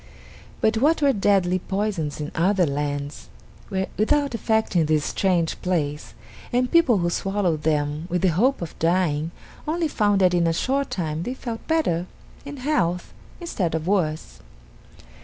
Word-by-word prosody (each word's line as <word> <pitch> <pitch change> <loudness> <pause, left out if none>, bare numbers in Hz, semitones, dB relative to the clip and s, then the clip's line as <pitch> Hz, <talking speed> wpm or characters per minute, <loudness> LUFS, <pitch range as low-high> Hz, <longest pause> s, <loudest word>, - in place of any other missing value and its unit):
But 220 0 +2
what 295 +6 +2
were 280 -1 +5
deadly 195 -3 +2
poisons 190 -7 -2
in 150 0 -4
other 185 +2 +2
lands 145 - -3 0.4
were 190 0 -1
without 280 +6 +2
effect 220 -2 0
in 165 -3 +3
this 155 -1 +1
strange 175 -4 0
place, 150 -5 -2 0.4
and 250 +1 +1
people 330 -10 +5
who 175 -2 +1
swallowed 195 -5 0
them 150 +1 -1
with 180 +1 -1
the 190 - +5
hope 225 - +2
of 165 - -7
dying, 165 -2 +1 0.4
only 325 +1 0
found 205 -7 +1
that 180 -1 +4
in 170 -1 +3
a 165 - +2
short 275 +10 0
time 160 -3 -3
they 250 +9 -4
felt 235 -4 -6
better 185 - +1 0.4
in 285 0 -7
health 185 - -1 0.3
instead 195 - -2
of 160 -1 -3
worse. 155 - -1
185 Hz, 160 wpm, -23 LUFS, 160-225 Hz, 0.4 s, were